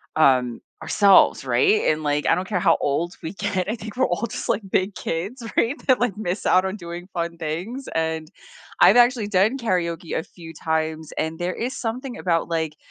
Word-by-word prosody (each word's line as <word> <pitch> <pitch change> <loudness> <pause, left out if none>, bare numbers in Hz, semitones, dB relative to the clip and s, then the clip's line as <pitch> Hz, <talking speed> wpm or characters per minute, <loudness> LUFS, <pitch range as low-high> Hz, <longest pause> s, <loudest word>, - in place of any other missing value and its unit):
um, 130 -6 +3 0.2
ourselves, 200 -2 +4
right? 425 0 +3
And, 155 0 -3
like, 145 0 0
I - - +4
don't 185 +1 -3
care 195 -3 -1
how - - +4
old 165 +5 -1
we 165 +2 -5
get. 195 -1 -2
I 225 - -1
think 220 +1 -9
we're 260 - +3
all 175 +6 -1
just, - - -6
like, 220 - +1
big 190 +2 0
kids, 200 +10 -4
right, 240 +5 +2
that, 260 -2 +4
like, 240 -5 0
miss 195 -2 -3
out 185 - +4
on 190 +2 -3
doing 175 -1 -8
fun 170 -1 -3
things, 175 - -5
and 160 -1 -2 0.5
I've - - +8
actually 240 -3 +4
done 205 +5 +2
karaoke 175 - -2
a - - -2
few 165 -2 -12
times 160 0 -2
and 160 +1 -2
there 175 +2 -2
is 245 +3 -4
something 245 +2 -4
about, 170 -2 0
like, 160 -2 -2
180 Hz, 200 wpm, -23 LUFS, 160-220 Hz, 0.5 s, I've